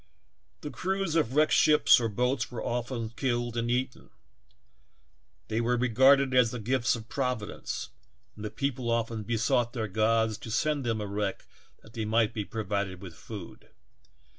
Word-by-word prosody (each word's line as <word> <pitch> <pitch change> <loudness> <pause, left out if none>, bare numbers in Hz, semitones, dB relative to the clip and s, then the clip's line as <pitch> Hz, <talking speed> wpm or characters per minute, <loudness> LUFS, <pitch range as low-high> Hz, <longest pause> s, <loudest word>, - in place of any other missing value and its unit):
The 150 - -6
crews 190 -2 -2
of 135 -6 +1
wrecked 155 +1 +4
ships 150 -4 +6
or 115 -2 -1
boats 125 +3 -1
were 120 - -5
always 120 -1 -3
killed 120 -1 -1
and 120 0 -1
eaten; 125 +1 -2 1.4
they 110 +1 -1
were 120 +1 +1
regarded 130 +3 +4
as 125 -3 +5
the 125 - -5
gifts 120 +1 +1
of 115 -1 -9
Providence 125 -4 -3 0.5
and 110 - -9
the 105 - -3
people 130 -2 -2
often 115 -1 -1
besought 115 +2 0
their 110 -4 -2
gods 110 +2 +1
to 115 - -9
send 145 +4 0
them 110 -2 0
a - - -3
wreck 100 -1 -3 0.4
that 110 - -16
they 110 -2 -3
might 110 0 +2
be 110 -3 -2
provided 100 -3 -3
with 90 -3 -9
food. 100 0 -10
115 Hz, 165 wpm, -28 LUFS, 110-125 Hz, 1.4 s, ships